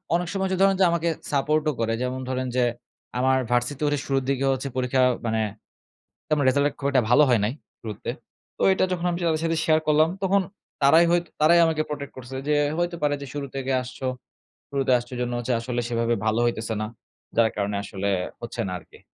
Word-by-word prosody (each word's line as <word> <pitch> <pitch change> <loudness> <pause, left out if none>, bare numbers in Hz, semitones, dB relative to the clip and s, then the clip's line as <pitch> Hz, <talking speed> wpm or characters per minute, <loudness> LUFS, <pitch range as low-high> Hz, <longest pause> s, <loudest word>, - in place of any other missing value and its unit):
অনেক 175 0 0
সময় 190 -1 -1
যে 190 - 0
ধরেন 195 0 +5
যে - - +7
আমাকে 170 0 +1 0.2
সাপোর্টও 150 +2 +1
করে 115 0 0
যেমন 125 +1 -2
ধরেন 130 0 -1
যে, 125 - +3 0.6
আমার 130 +1 +3
ভার্সিটির 140 +4 +1
শুরুর 135 -1 0
দিকে 135 0 +1
হচ্ছে 135 +1 -2
পরীক্ষা 130 +1 +1 0.2
মানে, 110 -1 +1 0.9
আমার 145 -2 +2
রেজাল্ট 140 +2 +2
খুব 140 - -1
একটা 130 -3 +3
ভালো 135 +5 +7
হয় 120 -3 +4
নাই, 110 - -1 0.3
শুরুতে, 110 -1 -6 0.5
তো - - -8
এটা 185 - +2
যখন 180 -1 -2
আমি 170 - -2
তাদের 160 -1 +1
সাথে 165 0 0
শেয়ার 155 -1 +4
করলাম 155 +1 +4
তখন 195 +1 +3 0.4
তারাই 160 +5 +6
হয়ত 175 0 +2 0.2
তারাই 170 +3 +6
আমাকে 160 -1 +1
protect 145 -2 -5
করছে 130 +1 -8
যে, 150 - +3 0.2
"হইতে 175 0 -1
পারে 145 -1 +2
যে 140 - -6
শুরু 145 -1 -4
থেকে 135 0 -2
আসছ, 125 0 -9 0.7
শুরুতে 135 -2 0
আসছ, 120 0 -6
সে - - -5
জন্য 120 0 -2
হচ্ছে 120 +1 -1
আসলে 120 +1 -2
সেভাবে 115 0 +1
ভালো 110 +1 +2
হইতেছে 115 -1 -1
না, 110 - -2 0.5
যার 115 -1 +4
কারণে 100 0 -1
আসলে 100 0 -3 0.3
হচ্ছে 120 0 -4
না - - -4
আরকি।" - - -18
135 Hz, 200 wpm, -25 LUFS, 120-155 Hz, 0.9 s, যে